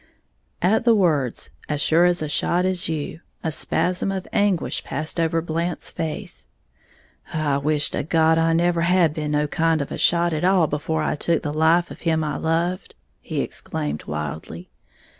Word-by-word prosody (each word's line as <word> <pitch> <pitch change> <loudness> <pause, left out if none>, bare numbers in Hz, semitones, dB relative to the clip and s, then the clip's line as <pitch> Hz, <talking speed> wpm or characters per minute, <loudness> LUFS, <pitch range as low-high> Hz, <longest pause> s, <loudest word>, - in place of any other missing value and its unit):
At 210 +6 +3
the 230 -1 +5
words, 150 - +1 0.2
"as 150 -1 -1
sure 160 +4 +4
a 175 0 +4
shot 175 +4 +1
as 185 -1 0
you," 155 0 -4 0.2
a 160 - -1
spasm 180 +5 0
of 190 -1 -4
anguish 205 -5 +1
passed 155 +4 -3
over 165 0 +1
Blant's 170 +1 -3
face. 160 -2 -5 0.8
"I 150 -3 0
wish 150 +1 +1
to - - -1
God 160 +1 +3
I 165 0 +2
never 170 0 +2
had 170 -2 +3
been 150 -1 -3
no 150 0 +1
kind 165 +2 +1
of 140 - -4
a - - -4
shot 170 0 +3
at 155 - -2
all 185 -2 +4
before 155 +1 -2
I - - 0
took 165 +2 0
the 145 - -3
life 165 +3 +3
of - - -10
him 160 -2 +1
I 150 -2 -2
loved!" 170 +3 -1 0.3
he - - -3
exclaimed, 75 0 -4
wildly. 75 +3 -6
160 Hz, 175 wpm, -23 LUFS, 150-175 Hz, 0.8 s, the